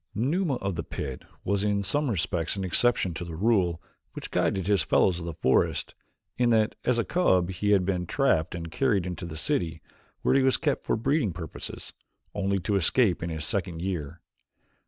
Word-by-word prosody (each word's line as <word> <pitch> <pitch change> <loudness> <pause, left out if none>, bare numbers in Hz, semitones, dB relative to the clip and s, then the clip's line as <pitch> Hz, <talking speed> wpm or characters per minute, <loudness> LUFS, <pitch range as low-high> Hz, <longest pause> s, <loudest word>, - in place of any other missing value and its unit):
Numa 145 - +1
of 100 -4 -3
the 85 -1 -3
pit 65 -4 -6 0.2
was 100 +1 0
in 100 -1 +1
some 145 +8 +1
respects 85 -4 -1
an 95 - -3
exception 95 -1 +2
to 85 - -5
the 85 -2 -7
rule 90 -3 +2 0.3
which - - -7
guided 95 -2 0
his 100 -1 +3
fellows 90 -2 +2
of 85 - -6
the 85 - -4
forest 65 - +1 0.5
in 120 -1 +4
that 110 -2 +3
as 125 -1 +2
a 115 - +2
cub 95 - +2
he 95 +3 -2
had 100 -3 +4
been 90 -2 -1
trapped 80 +2 +1
and 85 -1 -6
carried 105 -5 +1
into 90 0 -5
the 80 -2 -7
city, 80 +1 -1 0.4
where - - +3
he 135 - +4
was 130 0 +4
kept 145 -4 -1
for - - 0
breeding 130 - +1
purposes, 80 -2 -7 0.4
only 100 -1 0
to 100 +3 -1
escape 100 +2 +2
in 85 - -3
his 80 -2 -3
second 95 -6 -2
year. 85 -3 -4
95 Hz, 195 wpm, -27 LUFS, 85-110 Hz, 0.5 s, in